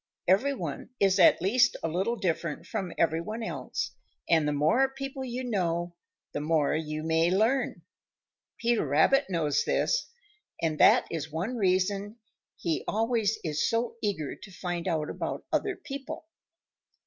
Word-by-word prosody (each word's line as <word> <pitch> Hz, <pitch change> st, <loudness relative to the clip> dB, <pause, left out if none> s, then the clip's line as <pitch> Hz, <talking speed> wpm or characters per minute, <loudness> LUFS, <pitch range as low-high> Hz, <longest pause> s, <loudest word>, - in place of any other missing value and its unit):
Every 225 Hz, +10 st, +3 dB
one -, -, -5 dB
is 195 Hz, -1 st, +3 dB
at 180 Hz, -, +6 dB
least 245 Hz, +5 st, +3 dB
a -, -, +1 dB
little 190 Hz, +8 st, 0 dB
different 170 Hz, -6 st, -2 dB
from 195 Hz, -6 st, -3 dB
every 165 Hz, 0 st, +2 dB
one 220 Hz, +6 st, -5 dB
else, -, -, -3 dB, 0.4 s
and 160 Hz, -3 st, +3 dB
the -, -, +1 dB
more 160 Hz, -, +3 dB
people 270 Hz, 0 st, -5 dB
you 250 Hz, 0 st, -4 dB
know, 175 Hz, -7 st, -1 dB, 0.4 s
the 145 Hz, -, -3 dB
more 150 Hz, -2 st, +2 dB
you 155 Hz, -1 st, -3 dB
may 160 Hz, +1 st, +2 dB
learn. 220 Hz, +8 st, +1 dB, 0.7 s
Peter 235 Hz, -1 st, +1 dB
Rabbit 160 Hz, -, +3 dB
knows 160 Hz, -5 st, +1 dB
this, -, -, +1 dB, 0.5 s
and 160 Hz, -2 st, -1 dB
that -, -, +6 dB
is 160 Hz, -1 st, -4 dB
one 185 Hz, +11 st, -2 dB
reason 195 Hz, +1 st, +1 dB, 0.4 s
he 165 Hz, -2 st, -2 dB
always 225 Hz, -1 st, +1 dB
is 155 Hz, -2 st, 0 dB
so 230 Hz, 0 st, -1 dB
eager 185 Hz, -9 st, -2 dB
to 200 Hz, -, -13 dB
find 175 Hz, -1 st, -4 dB
out 160 Hz, -4 st, -1 dB
about -, -, -4 dB
other 405 Hz, -3 st, +1 dB
people. 310 Hz, 0 st, -7 dB
190 Hz, 150 wpm, -28 LUFS, 160-235 Hz, 0.7 s, at